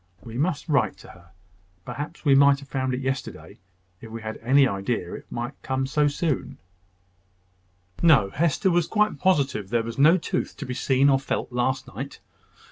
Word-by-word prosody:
"We 115 -1 -9
must 145 +4 -1
write 145 -5 +1
to - - -15
her. 85 0 -16 0.6
Perhaps 150 +4 -7
we 140 - +5
might 140 0 +5
have 140 - -13
found 130 -1 -1
it 130 - -4
yesterday, 135 0 -5 0.4
if 115 - -10
we 115 0 -8
had 110 0 -4
had - - -23
any 135 +3 +5
idea 100 -3 -3
it - - -8
would 120 +2 -4
come 130 0 -1
so 145 +2 +2
soon." 150 0 -2 1.4
No: 135 -13 +5
Hester 170 +5 +1
was 175 -1 +2
quite 210 0 +1
positive 140 - +1
there 115 +1 +1
was 115 +3 -6
no 160 +6 +6
tooth 165 - -3
to - - -6
be 125 - -4
seen 135 +2 +2
or 135 -1 +4
felt 135 - -3
last 125 +2 -1
night. - - -7
135 Hz, 185 wpm, -25 LUFS, 120-150 Hz, 1.4 s, no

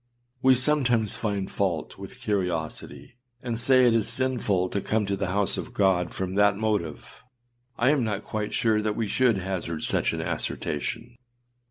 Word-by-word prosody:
We 130 0 +6
sometimes 125 -5 +2
find 100 -3 -2
fault 90 -6 -2
with - - -9
curiosity, 85 - -3 0.3
and 120 -2 -3
say 130 +1 +5
it 120 - +5
is 115 -2 +2
sinful 115 -7 0
to 100 - -2
come 110 +1 0
to 100 0 -1
the 100 0 -2
house 100 +2 +1
of - - -8
God 95 -3 +2
from 95 -1 -4
that 105 0 +3
motive; 105 -8 -3 0.5
I 130 +4 +4
am 145 -4 +2
not 105 -3 -2
quite 105 -1 -3
sure 110 -2 +2
that 105 -1 -1
we 115 - -1
should 120 +1 +2
hazard 90 -4 -4
such - - +1
an - - -3
assertion. 115 +11 -3
105 Hz, 170 wpm, -26 LUFS, 95-120 Hz, 0.5 s, We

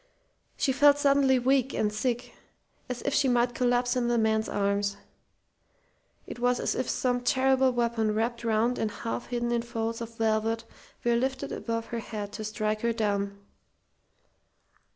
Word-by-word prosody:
She 270 - +1
felt 285 +2 +5
suddenly 275 -2 +4
weak 265 +1 +2
and 210 -1 0
sick, 240 +2 -2 0.6
as 250 -1 -4
if 280 - -1
she 285 - +3
might 245 -1 +2
collapse 245 0 +1
in 245 -1 +1
the 240 0 +2
man's 220 -1 +1
arms. 200 0 0 1.3
It - - -8
was 245 0 +2
as - - 0
if 255 - -2
some 245 -1 0
terrible 260 +1 +3
weapon 235 -3 0
wrapped 235 +2 -1
round 230 +2 +1
and 220 - 0
half 230 +3 -5
hidden 240 -1 -2
in 235 -1 +1
folds 230 0 -3
of 230 0 -7
velvet 225 +1 0 0.4
were 235 0 +2
lifted 265 +3 -1
above 230 -1 -3
her 235 - -1
head 210 -2 -6
to 215 - -5
strike 215 0 -2
her 235 0 +1
down. 200 -3 -1
235 Hz, 160 wpm, -28 LUFS, 220-250 Hz, 1.3 s, felt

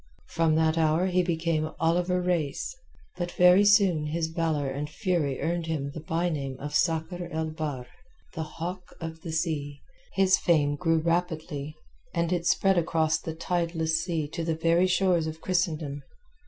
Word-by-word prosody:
From 165 -1 +2
that 160 0 +2
hour 160 +3 +3
he 180 -1 +2
became 165 -2 0
Oliver 175 +2 +2
Reis, 175 - -1 0.4
but 175 -1 -2
very 180 +2 +6
soon 195 -7 +4
his 160 +1 -1
valour 160 -3 -1
and 140 +2 -4
fury 155 -5 -1
earned 170 0 -1
him 145 -3 -2
the 160 - -6
by 165 +3 -1
name 135 -5 -3
of 145 +1 -6
Sakr 165 +2 0
el 160 0 -2
Bahr, 150 -5 -4 0.5
the 160 - -4
Hawk 175 +3 -6
of 160 -1 -6
the 165 - -6
Sea. 155 -3 -2 0.3
His 190 -1 +4
fame 145 -4 +2
grew 165 +1 +1
rapidly, 160 -3 -2 0.4
and 170 +1 +1
it 170 -1 -1
spread 195 +2 +3
across 160 -1 +1
the 160 0 -6
tideless 165 -2 0
sea 165 -4 -2
to 165 - -4
the 165 -1 0
very 170 +3 +3
shores 180 -3 +2
of 160 0 -6
Christendom. 160 -6 -1
165 Hz, 165 wpm, -27 LUFS, 155-175 Hz, 0.5 s, very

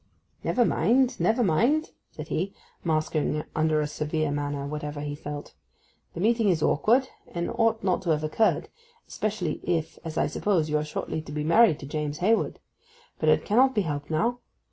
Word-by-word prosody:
'Never 245 - +2
mind, 250 +3 +2
never 235 +3 +2
mind,' 240 - +2 0.2
said 150 0 -9
he, 190 +5 -2 0.3
masking 155 -2 0
under 155 0 +2
a - - 0
severe 150 0 -2
manner 145 -1 -2
whatever 150 0 -5
he 145 0 -4
felt. 145 0 -7 0.6
'The - - -5
meeting 225 0 +3
is 165 -4 +1
awkward, 245 - +3 0.2
and 170 0 -3
ought 225 -1 +1
not 185 -2 +1
to 180 - -4
have 155 -1 +2
occurred, 185 +8 +1 0.4
especially 200 -7 -2
if 165 -2 -2
as 160 -1 -6
I - - +3
suppose, 160 -2 0
you 150 - +3
are - - -2
shortly 155 +1 -4
to 150 - -10
be 150 0 -2
married 170 +2 +5
to - - -7
James 150 +1 -3
Hayward. 220 +7 +1 0.6
But - - +2
it - - +3
cannot 255 +5 +4
be 210 - +3
helped 145 -5 -4
now. 230 +11 0
160 Hz, 180 wpm, -26 LUFS, 150-220 Hz, 0.6 s, married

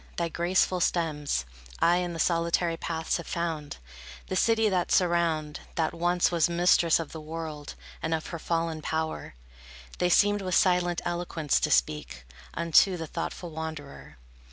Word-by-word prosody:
Thy 170 -1 -1
graceful 180 +2 +1
stems 155 - 0 0.3
I 175 +1 +4
in 175 -1 -2
the 165 - -6
solitary 170 +1 +1
paths 160 -1 -2
have 170 - -8
found, 160 - -3 0.5
The 185 - -2
city 225 +2 +3
that 185 -3 0
surround, 170 -4 +1 0.2
That 160 -2 0
once 175 +1 +1
was 170 0 +2
mistress 170 -1 +4
of 165 - -5
the 160 - -7
world; 155 -1 -7 0.3
And 160 - -2
of 160 - -5
her 170 - -5
fallen 165 -1 -2
power, 160 - -3 0.6
They 180 - +2
seemed 205 +3 +4
with 185 -2 -1
silent 180 -2 +2
eloquence 170 -4 0
to - - 0
speak 60 0 0 0.3
Unto 170 +3 +4
the 165 - -5
thoughtful 170 +2 -5
wanderer. 155 - -8
170 Hz, 155 wpm, -27 LUFS, 160-175 Hz, 0.6 s, I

